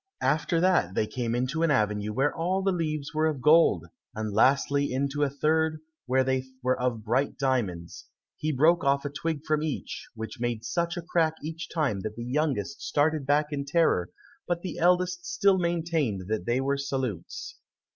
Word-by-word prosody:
After 160 +2 +1
that 175 - +2
they - - +2
came 115 +1 -2
into 130 +6 -1
an 165 - +3
avenue 105 -5 +1
where 135 +6 +1
all 185 +4 0
the 195 - +2
leaves 155 -3 -2
were 155 +1 +2
of 150 -4 -2
gold, 150 - +5 0.3
and 110 -1 -3
lastly 140 +5 +3
into 140 +3 -1
a 145 - +3
third 155 +2 +1 0.3
where 130 +1 +3
they 130 0 0 0.2
were 130 0 +2
of 125 -3 -1
bright 130 +6 0
diamonds; 110 -11 -2 0.3
he 155 - -2
broke 160 +5 +3
off 140 0 +2
a 145 - -3
twig 155 0 -3
from 155 -1 +1
each, 155 -2 -4
which 110 -1 -7
made 120 -2 -2
such 170 +4 -1
a 175 - -4
crack 165 -2 +1
each 160 +2 -6
time 145 - 0
that 105 +2 -5
the 120 - -6
youngest 140 -2 -1
started 150 -1 +1
back 150 +1 +2
in 140 -1 -2
terror, 140 - +2 0.4
but 175 -1 -1
the 185 - -5
eldest 180 0 +2
still 195 -1 +3
maintained 165 - 0
that 110 -5 -2
they 120 +2 +2
were 140 +1 0
salutes. 140 - -4
145 Hz, 185 wpm, -27 LUFS, 125-165 Hz, 0.4 s, gold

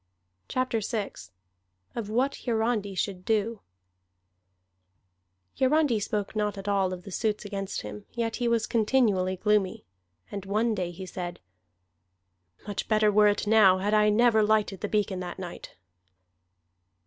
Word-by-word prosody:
CHAPTER 255 -3 0
VI 215 -1 -3 0.8
OF 225 -3 -4
WHAT 255 +5 0
HIARANDI 220 -3 0
SHOULD 185 0 -2
DO 220 +1 0 2.0
Hiarandi 270 -3 +3
spoke 205 0 -3
not 210 -1 -1
at 195 +1 -7
all 195 -2 +2
of 180 -1 -6
the 195 - -9
suits 215 +2 -1
against 195 -1 -4
him, 105 0 -8
yet 230 -2 -2
he 240 - 0
was 230 -2 +2
continually 210 -5 +2
gloomy. 210 -1 +1 0.5
And 200 - -5
one 220 +3 +1
day 185 -4 -2
he 175 +2 -8
said: 180 -1 -6 1.3
"Much 205 -1 -4
better 215 -1 +3
were 210 +1 +5
it 205 +1 +1
now, 205 -3 +6
had 205 +3 -1
I 210 0 +5
never 220 +1 +4
lighted 210 -2 +1
the 205 - -2
beacon 205 -3 0
that 180 -1 -6
night." 180 -2 -8
210 Hz, 140 wpm, -27 LUFS, 195-225 Hz, 2.0 s, now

